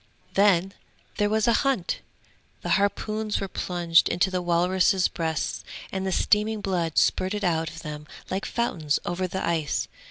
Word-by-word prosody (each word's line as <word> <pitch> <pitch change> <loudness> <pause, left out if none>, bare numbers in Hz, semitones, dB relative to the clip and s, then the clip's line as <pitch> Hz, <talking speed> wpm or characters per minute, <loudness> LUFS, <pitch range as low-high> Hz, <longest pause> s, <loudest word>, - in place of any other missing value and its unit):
'Then 195 -1 +3 0.4
there 205 0 +2
was 220 +1 +1
a 235 - +5
hunt! 270 -11 0 0.6
The - - -3
harpoons 215 +1 0
were 195 - -3
plunged 175 -3 +2
into 185 +2 +1
the 180 -1 -1
walruses' 180 +2 +3
breasts, 160 -2 -2 0.3
and 190 0 -2
the - - 0
steaming 210 +3 +2
blood 175 -5 -1
spurted 205 +3 +2
out 165 -2 +1
of - - -10
them 150 -1 -7 0.2
like 195 +3 -2
fountains 160 -11 0
over 185 +1 -1
the 190 +1 -3
ice. 160 -4 0
185 Hz, 155 wpm, -26 LUFS, 170-205 Hz, 0.6 s, a